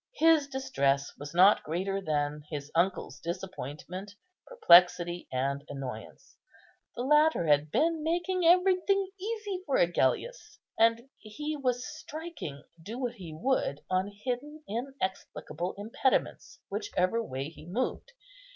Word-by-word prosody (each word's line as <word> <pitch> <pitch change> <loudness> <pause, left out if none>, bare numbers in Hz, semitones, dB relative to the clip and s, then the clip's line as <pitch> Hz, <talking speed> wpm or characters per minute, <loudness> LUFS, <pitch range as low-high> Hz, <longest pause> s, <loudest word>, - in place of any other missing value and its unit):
His 320 -3 +4
distress 140 - 0
was 145 +1 -7
not 190 +4 +6
greater 190 +5 -2
than 150 -3 -1
his 145 -2 -6
uncle's 180 +3 0
disappointment, 185 +2 -6 0.3
perplexity, 175 - +5
and 140 +2 -1
annoyance. 130 -6 -8 0.6
The 240 - -3
latter 300 - +4
had 150 0 +3
been 320 - +1
making 350 +3 0
everything 370 +3 +4
easy 415 -2 -4
for 275 - +2
Agellius, 175 - 0 0.2
and 230 +2 +3
he 295 +9 -5
was 255 -3 -1
striking, 305 - -7 0.2
do 215 +8 -7
what 250 -2 -2
he 185 -8 -9
would, 155 - -1
on 185 +1 +1 0.2
hidden, 290 +5 -4
inexplicable 190 - -4
impediments, 225 +5 -1
whichever 230 - 0
way 135 -6 -4
he 160 0 -14
moved. 255 - -3
210 Hz, 120 wpm, -29 LUFS, -, 0.6 s, not